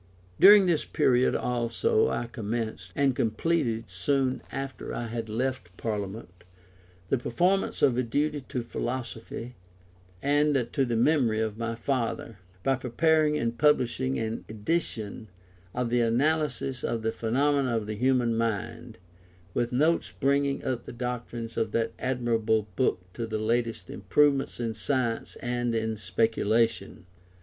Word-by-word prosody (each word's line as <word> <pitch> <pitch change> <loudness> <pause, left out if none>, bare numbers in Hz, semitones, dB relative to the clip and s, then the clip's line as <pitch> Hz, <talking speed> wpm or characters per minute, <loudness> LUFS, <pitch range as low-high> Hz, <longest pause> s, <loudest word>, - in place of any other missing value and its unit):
During 205 0 +9
this 170 -4 +2
period 125 0 +2
also 280 - +1
I - - -1
commenced 110 -4 -4
(and 140 -3 +2
completed 115 0 0
soon 130 +9 0
after 135 0 -5
I 120 - -3
had 115 -1 -4
left 120 -5 -3
Parliament) 100 -4 -5 0.7
the 135 - +2
performance 180 +11 +1
of 130 - +5
a - - +4
duty 145 +5 -1
to 125 - -2
philosophy 120 0 -5 0.7
and 145 -2 +2
to 135 -3 +1
the 120 -2 -1
memory 120 -3 +3
of 110 0 -2
my 115 0 -2
father, 115 -3 -2 0.2
by 135 +3 +2
preparing 150 +4 +2
and 115 -2 -1
publishing 130 -2 +2
an 110 0 -3
edition 110 -2 -3 0.4
of 125 +1 -2
the 120 0 +3
Analysis 135 +2 0
of 115 -1 -2
the 110 - +1
Phenomena 130 +2 +1
of 110 - -3
the 105 - -4
Human 125 0 +2
Mind, 115 +1 -3 0.6
with 120 0 0
notes 155 +7 +2
bringing 140 0 +1
up 125 -2 -2
the - - -7
doctrines 120 -1 -5
of 110 -1 -1
that 115 -1 +1
admirable 115 -4 0
book 105 -4 +1
to 115 - -4
the 110 -1 -2
latest 115 +1 -1
improvements 140 0 +1
in 115 -2 -2
science 115 +1 -2
and 120 -1 -1
in 110 0 -1
speculation. 110 +1 0
120 Hz, 140 wpm, -28 LUFS, 115-135 Hz, 0.7 s, During